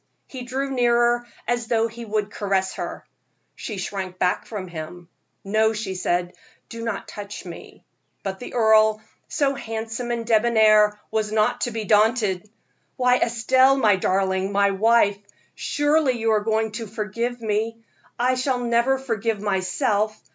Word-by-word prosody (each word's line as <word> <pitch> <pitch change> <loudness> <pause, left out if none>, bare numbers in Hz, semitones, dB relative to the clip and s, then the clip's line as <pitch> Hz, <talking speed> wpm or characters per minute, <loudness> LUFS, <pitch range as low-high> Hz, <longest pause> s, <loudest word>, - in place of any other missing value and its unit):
He 260 - -9
drew 265 +2 -3
nearer, 240 -1 +2 0.2
as 240 -1 -1
though 230 -1 +2
he 230 +1 -9
would 210 -1 -2
caress 195 -2 -1
her. - - -6 0.5
She 215 - -6
shrunk 185 -1 -4 0.3
from 200 -4 -6
him. 170 +1 -8 0.3
"No," 220 +2 +2
she 215 -3 -4
said, 175 -1 -1 0.4
"do 230 0 -7
not 230 -3 -4
touch 205 -1 -8
me." 170 -2 -11 0.4
But 190 -1 -4
the 245 - -8
earl, 220 -2 +4 0.3
so 285 -4 0
handsome 225 -1 -5
and 235 -1 -2
debonair, 215 -2 +4
was 215 -1 -1
not 220 +3 +1
to - - 0
be 225 -1 -4
daunted. 210 -2 +2 0.5
"Why, 250 -1 +3
Estelle, 260 +4 +3
my 215 -6 +4
darling, 190 +1 0
my 200 0 +3
wife, 205 0 +3 0.3
surely 290 -2 +1
you 225 -2 0
are 215 - +3
going 220 0 0
to 225 +1 -6
forgive 230 +4 -3
me 225 +1 -2 0.3
I 250 +2 +2
shall 255 0 0
never 240 +2 +1
forgive 225 -4 -2
myself. 205 +2 0
220 Hz, 145 wpm, -23 LUFS, 205-240 Hz, 0.5 s, earl